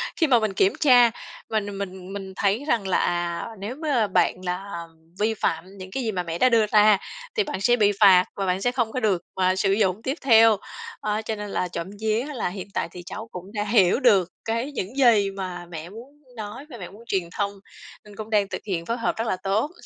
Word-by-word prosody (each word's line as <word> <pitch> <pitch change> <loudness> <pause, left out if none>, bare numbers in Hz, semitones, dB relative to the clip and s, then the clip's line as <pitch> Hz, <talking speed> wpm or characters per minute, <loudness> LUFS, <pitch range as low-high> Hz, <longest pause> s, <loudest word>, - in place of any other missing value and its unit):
khi 325 - +2
mà 250 -4 +5
mình 215 -3 -1
kiểm 190 +1 +3
tra 245 -5 +6 0.4
mình 205 -2 -2
mình 190 -1 -6
mình 195 -1 -7
thấy 205 +7 +1
rằng 225 -9 +1
là, 190 - +2
à, 175 -1 -1
nếu 210 +6 -5
m 300 - -15 0.3
bạn - - +3
là 180 -1 -4 0.3
vi 220 +2 +2
phạm 185 -1 -3
những 185 -1 -9
cái 265 +5 -3
gì 225 - -1
mà 180 -3 -2
mẹ 165 -1 -4
đã 255 - +4
đưa 230 -3 +4
ra 210 -1 +5 0.4
thì 435 - +3
bạn 295 - -5
sẽ 240 +4 +4
bị 210 -3 +3
phạt 185 -3 +7
và 195 - -2
bạn 185 +1 0
sẽ 245 - +1
không 240 -3 -1
có 255 - -2
được, 200 -6 +1
à, 185 0 +2
sử 195 +1 +1
dụng 195 -1 +1
tiếp 265 +5 -2
theo. 225 -4 +6 0.4
Ơ, 215 0 -1
cho 220 - -2
nên 210 -1 -6
là 180 - -1
trộm 170 -1 -5
vía 220 +3 0
là 230 -8 -2
hiện 190 0 -7
tại - - -1
thì 180 - -9
cháu 220 +5 -7
cũng 180 0 -8
đã 210 -1 -1
hiểu 205 0 +3
được 200 -9 +4 0.2
cái 230 +5 -2
những 220 -4 -5
gì 220 -7 +4
mà 185 -2 -6
mẹ 165 0 -7
muốn 230 +6 -11 0.3
nói 220 +5 -7
và 245 - -9
mẹ 180 -4 -8
muốn 210 +4 -14
truyền 185 -5 -1
thông, 200 -1 0 0.5
nên 210 -1 -14
cũng 215 +1 -7
đang 210 -2 +2
thực - - -5
hiện 170 -4 -2
phối 230 +5 -2
hợp 230 - -1
rất 225 0 -2
là - - +1
tốt. 210 +10 0
205 Hz, 240 wpm, -24 LUFS, 185-225 Hz, 0.5 s, phạt